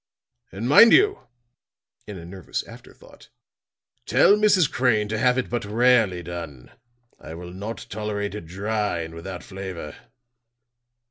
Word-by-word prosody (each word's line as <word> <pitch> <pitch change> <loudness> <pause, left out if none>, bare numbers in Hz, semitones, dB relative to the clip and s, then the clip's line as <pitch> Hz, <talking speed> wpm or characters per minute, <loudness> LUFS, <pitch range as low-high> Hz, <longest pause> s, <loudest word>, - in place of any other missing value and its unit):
And 105 +5 -5
mind 190 - +8
you," 405 +1 +3 0.8
in 105 - -8
an 85 0 -10
nervous 95 -3 -5
afterthought, - - -16 0.8
"tell 200 - +5
Mrs. 205 -6 +3
Crane 115 -5 +1
to 110 - -2
have 125 +2 +2
it 130 - -1
but 120 -1 -3
rarely 110 -4 +2
done. 80 -7 -8 0.5
I 80 - -10
will 90 +1 -9
not 105 +5 -7
tolerate 105 -1 -4
it 105 -6 -8
dry 105 0 -2
and 80 0 -7
without 90 +2 -8
flavor." 95 -5 -8
105 Hz, 135 wpm, -23 LUFS, 90-120 Hz, 0.8 s, mind